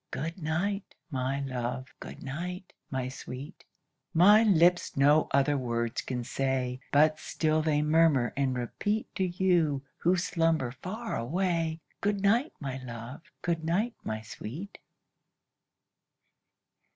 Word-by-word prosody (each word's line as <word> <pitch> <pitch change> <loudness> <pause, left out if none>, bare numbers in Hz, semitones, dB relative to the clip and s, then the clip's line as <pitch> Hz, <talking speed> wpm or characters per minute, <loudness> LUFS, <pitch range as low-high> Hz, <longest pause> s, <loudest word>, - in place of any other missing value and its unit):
Good 165 +4 -4
night, 185 +6 -2 0.2
my 135 +1 -1
love! 130 -1 -3
good - - -9
night, 180 +7 -5 0.2
my 130 -2 -2
sweet! 130 +4 -8 0.5
My 205 +6 +8
lips 180 -7 +4
no 145 +3 +5
other 140 +2 +3
words 115 -2 -1
can 125 -2 -3
say, 130 0 -1
But 155 +2 +4
still 155 0 0
they 150 -1 +2
murmur 150 -5 +3
and 135 -2 0
repeat 205 - -2
To 190 - -1
you, 175 -6 +2
who 175 +2 +3
slumber 165 -7 +1
far 200 - -5
away, 165 +4 -1 0.2
Good 205 0 +1
night, 230 +9 +3
my 135 -3 -4
love! 120 +2 -7 0.2
good 170 -2 0
night, 200 +9 +1
my 110 0 -3
sweet! 140 - -8
155 Hz, 125 wpm, -29 LUFS, 130-180 Hz, 0.5 s, My